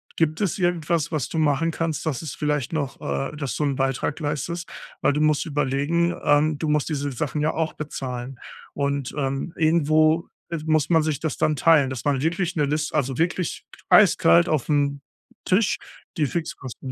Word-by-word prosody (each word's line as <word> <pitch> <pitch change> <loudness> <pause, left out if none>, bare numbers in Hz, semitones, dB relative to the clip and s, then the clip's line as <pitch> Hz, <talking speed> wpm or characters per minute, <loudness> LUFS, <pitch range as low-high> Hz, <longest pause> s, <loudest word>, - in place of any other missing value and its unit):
„Gibt 160 +2 0
es 195 - 0
irgendwas, 170 -3 0
was 150 -5 -2
du - - -4
machen 155 +1 +2
kannst, 160 -2 -3
dass 150 -6 -2
es 155 - -5
vielleicht 150 -2 -1
noch 140 -4 -3
äh, 70 - -3
dass 140 -4 -3
du - - -1
'n 140 -1 0
Beitrag 135 +3 -1
leistest, 170 +3 -3 0.3
weil - - +3
du 150 - 0
musst 155 -1 +2
überlegen, 145 +4 0
ähm, 150 +1 +3
du 160 - -3
musst 150 -1 +1
diese 145 -2 -2
Sachen 145 +4 -3
ja 155 +1 +1
auch 160 -1 -1
bezahlen 130 -4 -6 0.3
und, 140 -2 -2
ähm, 135 +3 -2
irgendwo 155 0 +3 0.4
muss 155 -2 +2
man 165 -2 +4
sich 150 -3 -1
das 160 -3 -3
dann 155 - +2
teilen“, 150 -3 +4
dass 130 -2 -5
man 140 -3 +1
wirklich 170 +3 -1
'ne 150 -3 +2
Liste 150 +2 -2
also, 135 -3 0
wirklich 170 +1 -1 0.2
eiskalt 85 +1 +6
aufm 145 -1 0 0.4
Tisch, 195 +3 +2 0.4
die 155 - +2
Fixkosten 135 -3 -5
150 Hz, 175 wpm, -24 LUFS, 140-160 Hz, 0.4 s, eiskalt